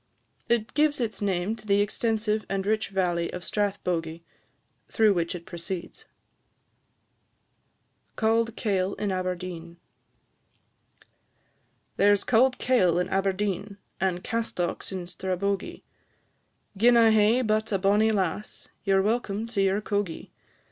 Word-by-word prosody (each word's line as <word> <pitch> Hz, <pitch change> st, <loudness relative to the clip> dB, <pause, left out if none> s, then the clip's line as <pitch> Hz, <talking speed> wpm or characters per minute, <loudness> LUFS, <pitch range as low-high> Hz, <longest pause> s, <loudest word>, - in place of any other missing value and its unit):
It 225 Hz, -1 st, +1 dB
gives 300 Hz, -1 st, +2 dB
its 225 Hz, -4 st, -2 dB
name 195 Hz, +1 st, 0 dB
to 215 Hz, -1 st, -15 dB
the 200 Hz, 0 st, +3 dB
extensive 215 Hz, +1 st, 0 dB
and 195 Hz, -1 st, -2 dB
rich 220 Hz, +1 st, 0 dB
valley 175 Hz, -3 st, 0 dB
of 180 Hz, -, -6 dB
Strathbogie, 175 Hz, -6 st, -2 dB, 0.7 s
through 220 Hz, -3 st, +4 dB
which 170 Hz, -1 st, -1 dB
it 170 Hz, -1 st, -8 dB
proceeds. 185 Hz, -, -6 dB, 2.1 s
CAULD 225 Hz, 0 st, +1 dB
KAIL 195 Hz, -3 st, -1 dB
IN 205 Hz, -2 st, -2 dB
ABERDEEN. 180 Hz, -2 st, -4 dB, 2.2 s
There 205 Hz, +1 st, +5 dB
's 200 Hz, -, -4 dB
cauld 255 Hz, +2 st, +3 dB
kail 185 Hz, -10 st, +2 dB
in 180 Hz, -, 0 dB
Aberdeen, 195 Hz, +1 st, -1 dB, 0.2 s
And 185 Hz, -1 st, -1 dB
castocks 225 Hz, -7 st, -2 dB
in 185 Hz, -2 st, -4 dB
Strabogie; 190 Hz, +2 st, -3 dB, 0.9 s
Gin 235 Hz, +4 st, +5 dB
I 225 Hz, -1 st, +6 dB
hae 220 Hz, +3 st, +4 dB
but 215 Hz, 0 st, 0 dB
a 195 Hz, -, +2 dB
bonnie 205 Hz, +3 st, +3 dB
lass, 200 Hz, -1 st, -2 dB
Ye 195 Hz, -, +1 dB
're 190 Hz, -, +3 dB
welcome 215 Hz, -1 st, -1 dB
to 225 Hz, -4 st, -2 dB
your 195 Hz, +1 st, +2 dB
cogie. 205 Hz, -5 st, -3 dB
200 Hz, 125 wpm, -26 LUFS, 185-220 Hz, 2.2 s, I